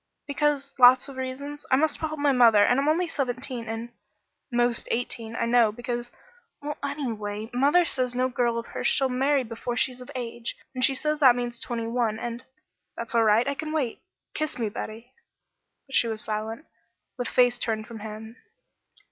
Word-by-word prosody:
"Because 285 -1 0
lots 250 +2 +7
of 275 - -9
reasons. 280 +3 -5
I - - +5
must 300 +2 +1
help 310 -1 -3
mother 245 -7 +5
and 245 - +3
I'm 280 - 0
only 345 +3 +2
seventeen, 255 -4 -3
and 225 +1 -5 0.3
" - - -53
"Most 240 -1 +1
eighteen, 230 -1 -2
I 235 - 0
know, 235 -2 +4
because 240 +1 -4 0.3
" 485 - -36
"Well, 295 0 -4
anyway, 225 -7 -4
mother 290 +8 +4
says 250 -5 0
no 255 +1 +2
girl 240 -2 0
of 230 - -3
hers - - -2
shall 270 -2 +3
marry 270 +2 +2
before 240 +1 -5
she's 255 0 0
of 250 - -11
age, 235 -1 -4 0.2
and 255 -1 -2
she 270 - +4
says 300 +2 -1
that 260 -5 +7
means 240 -1 -3
twenty 235 -2 -3
one, 230 -2 0
and 240 +1 -4 0.3
" - - -50
"That's 230 0 -5
all 230 -1 +4
right. 220 +3 +4
I 280 - +1
can 310 +2 -5
wait. 270 -7 -1 0.3
Kiss 310 -1 -2
me, 225 -3 -1
Betty." 225 +4 -7 0.7
But 270 - -14
she 235 - +4
was 220 -1 -3
silent, 220 +5 -4 0.5
with 245 - -1
face 245 -1 +3
turned 220 -1 -2
from 225 0 -9
him. 220 +2 -8
245 Hz, 190 wpm, -26 LUFS, 230-275 Hz, 0.7 s, lots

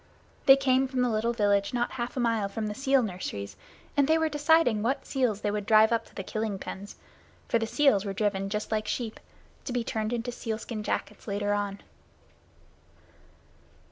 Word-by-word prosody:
They 270 - +10
came 265 -1 +2
from 255 -1 0
the 245 - +1
little 220 +2 +1
village 205 -1 +1
not 240 0 0
half 245 0 -4
a - - +1
mile 225 -4 +1
from 215 +2 -4
the 210 - -3
sea 270 +4 +2
nurseries, 180 - -3 0.4
and 285 -1 +3
they 320 +1 +4
were 320 0 +1
deciding 295 -6 +3
what 265 +5 -1
seals 245 -6 0
they 205 - 0
would 205 0 -3
drive 220 0 +6
up 230 - +1
to - - -21
the 195 - -4
killing 215 0 -3
pens 200 +2 -8 0.5
for 230 - +2
the 225 - -2
seals 275 -6 +3
were 200 - -3
driven 195 -1 -1
just 210 +2 -3
like 215 -1 -1
sheep 230 -3 -3 0.4
to - - -5
be 245 -1 0
turned 220 -1 -2
into 240 0 -2
seal 225 -2 -4
skin 220 -1 -6
jackets 210 0 -4
later 205 0 0
on. 205 -1 -2
220 Hz, 195 wpm, -28 LUFS, 205-250 Hz, 0.5 s, They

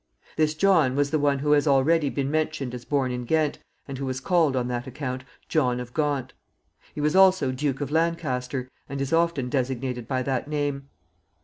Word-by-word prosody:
This 155 0 +1
John 160 -7 +3
was 145 0 +1
the 155 - +2
one 145 -1 +2
who 145 +2 0
has 150 +1 +4
already 145 +2 +3
been 140 0 -2
mentioned 155 -4 -1
as 120 -1 -7
born 135 -3 0
in 125 0 -3
Ghent, 155 +3 0 0.3
and 135 -2 -6
who 135 - -3
was 130 0 -2
called, 160 -2 +2
on 125 -1 0
that 125 +1 -3
account, 130 -1 -5 0.2
John 125 -6 +1
of 125 0 -7
Gaunt. 145 -4 -1 0.6
He - - -5
was 150 +3 +1
also 185 -8 +5
Duke 135 +1 -2
of 145 0 -3
Lancaster, 140 -6 -1 0.2
and 140 +1 -4
is 140 +2 -2
often 165 -6 +2
designated 125 -2 -2
by 130 -1 -1
that 130 +1 -2
name. 145 -2 -2
140 Hz, 195 wpm, -25 LUFS, 130-155 Hz, 0.6 s, also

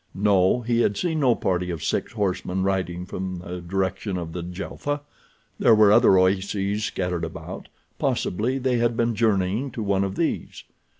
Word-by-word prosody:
No, 100 +2 +3
he 120 0 0
had 100 -4 +2
seen 160 -3 -1
no 130 -5 +4
party 90 -1 -1
of 85 -3 -4
six - - -1
horsemen 95 -3 -1
riding 90 -2 -1
from 95 0 -4
the 90 0 -7
direction 95 +2 -2
of 85 -2 -4
Djelfa. 90 - -4 0.6
There 115 - +6
were 105 -1 +6
other 110 -3 +6
oases 100 +2 +1
scattered 90 -4 -2
about—possibly 105 +7 -3
they 130 -2 +1
had 120 -1 +1
been 115 0 +1
journeying 110 +2 +1
to 110 - -4
one 100 -1 +1
of 95 0 -3
these. - - -2
100 Hz, 160 wpm, -24 LUFS, 90-115 Hz, 0.6 s, There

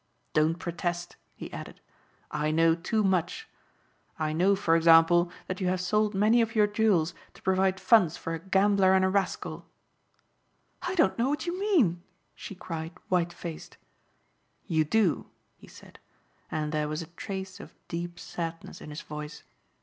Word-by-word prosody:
Don't 155 +2 +2
protest," 175 0 -4 0.2
he - - -9
added. - - -8 0.5
"I 150 +1 -1
know 165 +1 +4
too 185 +6 -1
much. 190 - 0 0.7
I 155 -1 -1
know 185 +5 +3
for 170 -4 +2
example 165 +1 +5
that 185 +1 -5
you 185 - 0
have 185 0 +1
sold 210 +3 +1
many 215 +4 +4
of 225 +1 -1
your 210 -1 +5
jewels 205 -6 +2 0.2
to - - -16
provide 190 0 +2
funds 190 -9 +4
for 165 - -5
a 165 - -3
gambler 190 +1 +3
and 190 0 +4
a - - +2
rascal." 195 0 -2 1.1
"I 360 +1 -3
don't 320 -8 +2
know 245 +3 +2
what 295 +3 -2
you 350 +1 -3
mean," 290 - +2 0.3
she 200 - -9
cried 165 -2 -6 0.2
white 175 -2 +1
faced. 170 -2 -8 0.9
"You 160 -2 +2
do," 190 0 +1 0.3
he - - -17
said, - - -15 0.5
and 155 -1 -2
there 150 -1 0
was 155 +2 -3
a - - -12
trace 190 +1 -6
of - - -12
deep 175 0 -5
sadness 165 -1 -6
in - - -9
his 150 +2 -7
voice. 150 0 -8
180 Hz, 165 wpm, -28 LUFS, 165-200 Hz, 1.1 s, example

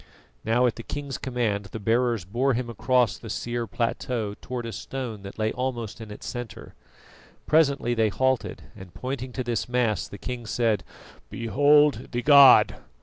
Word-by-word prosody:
Now 115 +3 +2
at 120 - 0
the - - -6
king's 140 +2 -6
command 115 -6 -2
the 105 +3 -7
bearers 115 -1 +1
bore 120 +7 0
him 120 0 -3
across 125 0 +1
the - - -9
sere 120 -1 -3
plateau 115 -2 -2
towards 125 -2 -5
a - - -5
stone 120 -4 -6
that 100 0 -10
lay 110 0 0
almost 120 -4 -4
in 110 - -8
its 105 - -10
centre. 120 -3 -7 0.7
Presently 140 -6 +2
they 110 -2 +2
halted, 130 +3 -1
and, 95 -2 -13
pointing 130 0 -5
to 130 - -3
this 120 -3 -2
mass, 115 -9 0
the 100 - -10
king 120 +3 -6
said: 115 -2 0 0.5
"Behold 145 +5 +3
the 120 0 -2
god!" 140 -1 +7
120 Hz, 165 wpm, -25 LUFS, 110-130 Hz, 0.7 s, god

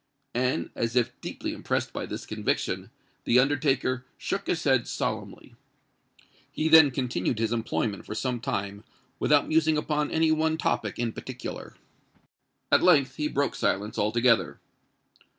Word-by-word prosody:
And, 125 +2 -1
as 115 +1 -2
if 120 -1 +2
deeply - - -5
impressed - - -2
by - - -4
this - - -6
conviction, - - -2 0.3
the 120 - +3
undertaker 135 -1 +2
shook 200 0 -3
his 165 - -1
head 130 -4 +2
solemnly. - - -4 1.0
He 155 +1 -1
then 160 -2 +8
continued 125 -2 -2
his 115 0 0
employment 110 -3 -2
for 105 - -5
some 125 +2 -2
time 100 -2 -4 0.4
without 145 -1 +3
musing 160 -1 +3
upon 150 -1 -1
any 160 0 +2
one 160 0 +1
topic 105 -9 -1
in 120 -2 -2
particular. - - -7 1.0
At - - +5
length 140 -7 +4
he 150 - 0
broke 140 -1 0
silence 105 +2 -1
altogether. 115 -2 +2
130 Hz, 140 wpm, -27 LUFS, 115-150 Hz, 1.0 s, then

